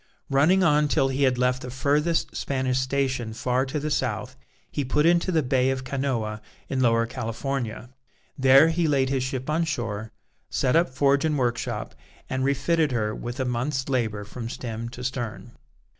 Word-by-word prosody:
Running 160 Hz, +8 st, +4 dB
on 150 Hz, -3 st, +4 dB
till 135 Hz, -2 st, +2 dB
he 135 Hz, +1 st, -2 dB
had 130 Hz, -2 st, +3 dB
left 125 Hz, +1 st, +1 dB
the 125 Hz, -, -6 dB
furthest 145 Hz, +6 st, 0 dB
Spanish 130 Hz, -2 st, -1 dB
station 130 Hz, -3 st, -1 dB
far 125 Hz, +3 st, 0 dB
to 140 Hz, +3 st, -2 dB
the 150 Hz, +1 st, -3 dB
south, 130 Hz, -1 st, -2 dB, 0.4 s
he 145 Hz, -, -1 dB
put 150 Hz, +4 st, +1 dB
into 170 Hz, +2 st, +3 dB
the 160 Hz, -3 st, +2 dB
Bay 130 Hz, 0 st, +2 dB
of 130 Hz, -1 st, -2 dB
Canoa 130 Hz, -6 st, -2 dB, 0.3 s
in 135 Hz, -, -1 dB
Lower 115 Hz, -2 st, +3 dB
California. 120 Hz, 0 st, -4 dB, 0.4 s
There 135 Hz, +4 st, +6 dB
he 165 Hz, 0 st, +1 dB
laid 135 Hz, -3 st, +2 dB
his 135 Hz, -1 st, 0 dB
ship 130 Hz, 0 st, -3 dB
on 155 Hz, +2 st, +1 dB
shore, 115 Hz, -9 st, -3 dB, 0.4 s
set 125 Hz, -, +1 dB
up 165 Hz, -2 st, +4 dB
forge 140 Hz, +2 st, +2 dB
and 155 Hz, -2 st, +1 dB
workshop, 120 Hz, -3 st, -2 dB, 0.4 s
and 130 Hz, 0 st, -1 dB
refitted 145 Hz, +3 st, +1 dB
her 110 Hz, -3 st, 0 dB
with 120 Hz, +3 st, -6 dB
a 130 Hz, -, 0 dB
month's 130 Hz, +2 st, -1 dB
labour 110 Hz, -6 st, -1 dB
from 115 Hz, +3 st, -7 dB
stem 115 Hz, -1 st, -5 dB
to 125 Hz, +1 st, -9 dB
stern. 120 Hz, -2 st, -4 dB
130 Hz, 175 wpm, -25 LUFS, 120-140 Hz, 0.4 s, There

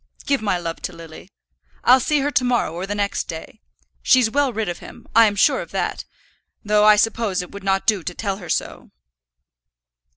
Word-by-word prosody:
Give 280 Hz, -3 st, +1 dB
my 200 Hz, -4 st, 0 dB
love 165 Hz, -1 st, -5 dB
to 180 Hz, -, -5 dB
Lily. 165 Hz, +2 st, -12 dB, 0.5 s
I'll 255 Hz, +2 st, +6 dB
see 295 Hz, +3 st, +1 dB
her 290 Hz, +2 st, -1 dB
to 260 Hz, -, +1 dB
morrow 245 Hz, -10 st, 0 dB
or 180 Hz, +3 st, -5 dB
the 205 Hz, -, -3 dB
next 205 Hz, -1 st, -1 dB
day. 160 Hz, +6 st, -9 dB, 0.4 s
She's 250 Hz, -4 st, +4 dB
well 285 Hz, +1 st, +1 dB
rid 220 Hz, -2 st, -3 dB
of 175 Hz, -, -4 dB
him; -, -, -13 dB
I'm 225 Hz, -3 st, +5 dB
sure 200 Hz, -, +3 dB
of -, -, -9 dB
that; -, -, -3 dB, 0.6 s
though 210 Hz, 0 st, +3 dB
I 215 Hz, 0 st, +8 dB
suppose 210 Hz, -3 st, 0 dB
it 180 Hz, -, -12 dB
would 200 Hz, -1 st, -10 dB
not 195 Hz, 0 st, 0 dB
do 210 Hz, -4 st, +2 dB
to 175 Hz, +1 st, -6 dB
tell 200 Hz, -3 st, -3 dB
her 180 Hz, -4 st, -11 dB
so." -, -, -3 dB
205 Hz, 200 wpm, -21 LUFS, 180-230 Hz, 0.6 s, I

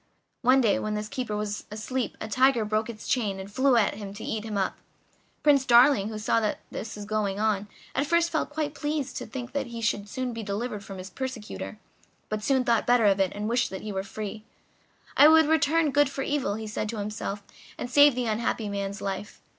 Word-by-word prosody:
One 260 Hz, +2 st, +5 dB
day 220 Hz, -5 st, +3 dB
when 215 Hz, 0 st, -2 dB
this 210 Hz, 0 st, -3 dB
keeper 215 Hz, -2 st, -3 dB
was 210 Hz, -1 st, -3 dB
asleep 225 Hz, +3 st, -3 dB
a -, -, -5 dB
tiger 255 Hz, 0 st, +3 dB
broke 215 Hz, +2 st, 0 dB
its 215 Hz, -2 st, -8 dB
chain, 210 Hz, -7 st, 0 dB
and 190 Hz, +1 st, -8 dB
flew 260 Hz, +3 st, +3 dB
at 215 Hz, -, +3 dB
him 200 Hz, -1 st, -8 dB
to 215 Hz, -, -8 dB
eat 215 Hz, -1 st, -3 dB
him 215 Hz, -2 st, -4 dB
up. 190 Hz, -1 st, -1 dB, 0.6 s
Prince 285 Hz, -3 st, +5 dB
Darling, 240 Hz, -4 st, +5 dB
who 215 Hz, -, -5 dB
saw 215 Hz, +2 st, +1 dB
what 215 Hz, -, 0 dB
was 210 Hz, -1 st, -6 dB
going 205 Hz, -2 st, -1 dB
on, 210 Hz, -2 st, +1 dB, 0.3 s
at 275 Hz, +2 st, 0 dB
first 340 Hz, +1 st, +2 dB
felt 315 Hz, -, 0 dB
quite 295 Hz, -1 st, -3 dB
pleased 295 Hz, -3 st, -3 dB
to -, -, -5 dB
think 250 Hz, -2 st, -6 dB
that 275 Hz, -2 st, -2 dB
he 235 Hz, -1 st, -7 dB
should 210 Hz, -2 st, -1 dB, 0.3 s
be 230 Hz, -, -5 dB
delivered 210 Hz, +1 st, -3 dB
from 195 Hz, -1 st, -8 dB
his 185 Hz, +1 st, -8 dB
persecutor, 250 Hz, -3 st, -5 dB, 0.5 s
but 215 Hz, 0 st, -2 dB
soon 265 Hz, +1 st, +2 dB
thought 235 Hz, -3 st, +1 dB
better 245 Hz, -2 st, +4 dB
of 200 Hz, -1 st, +4 dB
it 190 Hz, -2 st, +2 dB
and 205 Hz, +1 st, -3 dB
wished 240 Hz, +2 st, +1 dB
that 190 Hz, -, -7 dB
he 215 Hz, -, -4 dB
were 190 Hz, -1 st, -2 dB
free. 215 Hz, +2 st, -6 dB, 0.7 s
"I 290 Hz, -, +8 dB
would 320 Hz, 0 st, +7 dB
return 320 Hz, 0 st, +3 dB
good 290 Hz, 0 st, +4 dB
for 270 Hz, 0 st, -4 dB
evil," 265 Hz, -10 st, -1 dB
he 220 Hz, 0 st, -5 dB
said 215 Hz, 0 st, -3 dB
to 230 Hz, -, -4 dB
himself, 205 Hz, -1 st, -4 dB, 0.3 s
"and -, -, -4 dB
save 285 Hz, +1 st, +6 dB
the 250 Hz, -1 st, -1 dB
unhappy 220 Hz, -1 st, -1 dB
man's 200 Hz, 0 st, -4 dB
life." 200 Hz, +1 st, -4 dB
220 Hz, 220 wpm, -27 LUFS, 210-260 Hz, 0.7 s, I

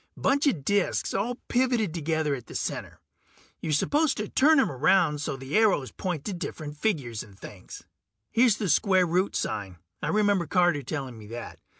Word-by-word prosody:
Bunch 280 Hz, +2 st, +2 dB
of 155 Hz, -, 0 dB
disks 205 Hz, -2 st, +1 dB
all 225 Hz, +6 st, -1 dB
pivoted 245 Hz, -7 st, +1 dB
together 160 Hz, -2 st, -1 dB
at 125 Hz, -4 st, -6 dB
the -, -, -10 dB
center; -, -, -4 dB, 0.6 s
you're 160 Hz, -, -3 dB
supposed 290 Hz, -, +2 dB
to 210 Hz, -, -3 dB
turn 300 Hz, +6 st, +4 dB
'em 270 Hz, -, +2 dB
around 150 Hz, +2 st, +2 dB
so 140 Hz, -, -3 dB
the 135 Hz, +2 st, -5 dB
arrows 205 Hz, -, +3 dB
point 175 Hz, -7 st, -4 dB
to 205 Hz, -, -3 dB
the 175 Hz, -, -7 dB
different 150 Hz, -4 st, -6 dB
figures 145 Hz, -, -1 dB
and 100 Hz, -5 st, -13 dB
things. 95 Hz, -3 st, -11 dB, 0.5 s
Here's 235 Hz, -3 st, +4 dB
the 205 Hz, -, -2 dB
square 185 Hz, +1 st, +3 dB
root 180 Hz, +3 st, 0 dB
sign, 100 Hz, -4 st, -3 dB, 0.2 s
I -, -, -2 dB
remember 205 Hz, -5 st, +2 dB
Carter 175 Hz, -3 st, +2 dB
telling 135 Hz, -4 st, -5 dB
me 105 Hz, -, -11 dB
that. 115 Hz, +1 st, -8 dB
170 Hz, 185 wpm, -27 LUFS, 140-210 Hz, 0.6 s, turn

